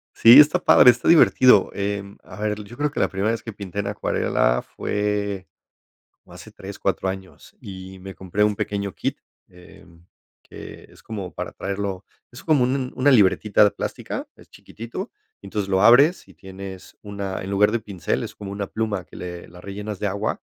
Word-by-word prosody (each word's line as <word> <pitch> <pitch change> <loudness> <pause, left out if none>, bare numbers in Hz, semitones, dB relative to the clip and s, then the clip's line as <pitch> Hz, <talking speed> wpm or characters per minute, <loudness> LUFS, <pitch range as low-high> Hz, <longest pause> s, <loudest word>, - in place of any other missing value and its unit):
Sí, 120 +4 +9
está 155 +4 +5
padre, 125 - +7
está 120 - -5
divertido, 130 - +5
em, 100 0 -4
a - - -12
ver, 105 0 -2
yo 120 +4 -13
creo 150 0 -1
que - - -5
la - - +3
primera 100 +3 -1
vez 115 - -3
que 115 - -7
pinté 100 -2 -7
en 100 - -2
acuarela 60 - 0
fue 100 -2 -3 0.8
o - - -16
hace - - -12
3, - - -10
4 - - -1
años, 95 -1 -8
y 95 -1 -10
me 95 +1 -9
compré 95 +2 -1
un 105 -1 +2
pequeño 100 -2 -3
kit, - - -3 0.3
em, 85 -1 -18 0.4
que - - -12
es - - -19
como 100 -5 -7
para - - -6
traerlo, 100 -1 -4 0.3
es 120 - -12
como 150 -6 +3
un 130 +2 0
un 130 -2 -4
una 140 +2 +3
libretita 105 -1 +4
plástica, - - -6
es - - -19
chiquitito, 120 - -8 0.3
entonces 100 -2 -4
lo 95 0 +2
abres 140 - +5
y - - -17
tienes 95 -1 -11
una, 100 -2 -5
en 95 - -6
lugar 105 +1 +3
de 115 - 0
pincel, 100 -7 -3
es - - -8
como 100 -2 -8
una 100 0 -4
pluma 105 -4 -3
que - - -17
le 90 -1 -8
la 90 0 -14
rellenas 105 +1 -7
de 105 - -1
agua, 100 +2 -3
100 Hz, 190 wpm, -22 LUFS, 95-110 Hz, 0.8 s, Sí